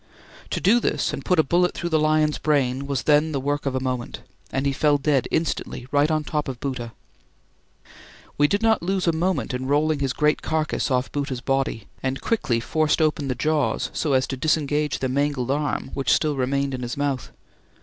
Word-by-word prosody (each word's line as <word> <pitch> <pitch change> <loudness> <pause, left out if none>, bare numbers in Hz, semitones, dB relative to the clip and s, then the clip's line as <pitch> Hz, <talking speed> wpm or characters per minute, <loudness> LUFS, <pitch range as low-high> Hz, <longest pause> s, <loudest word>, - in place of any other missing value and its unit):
To - - -2
do 220 +6 +4
this - - 0
and - - -5
put 180 - +2
a 160 - +5
bullet 175 +5 +2
through 170 - -3
the 160 - +3
lion's 155 0 +2
brain 140 -3 +1
was 140 -2 -1
then 150 +1 +3
the 140 - 0
work 145 +1 -2
of 135 - -1
a - - +1
moment; 130 -2 -4 0.3
and 135 +1 -1
he 140 - +1
fell 145 +1 +3
dead 140 -2 +1
instantly 160 -5 -2
right 145 +1 +3
on 155 -1 +1
the - - -10
top 150 -1 -1
of 130 -3 -5
Bhoota. 125 -4 -4 1.4
We 145 - +4
did 200 +7 0
not 225 -1 +3
lose 190 +2 -1
a 170 - +4
moment 170 -2 -1
in 130 +1 -3
rolling 150 +1 +2
his 135 -2 0
great 150 0 +1
carcase 155 -1 -1
off 125 -1 0
Bhoota's 140 -4 -3
body 135 -6 -1 0.2
and 130 0 -2
quickly 130 - 0
forced 155 +7 +1
opening 155 -2 +1
the 130 - -1
jaws 155 +2 0
so 150 -4 0
as 130 0 +3
to 135 - -4
disengage 150 0 0
the 130 - -1
mangled 135 -1 0
arm 145 -2 -1
which 135 - 0
still 150 -2 +2
remained 135 +1 0
in 130 - -4
his 120 +1 -4
mouth. 140 -5 -2
145 Hz, 210 wpm, -23 LUFS, 130-155 Hz, 1.4 s, a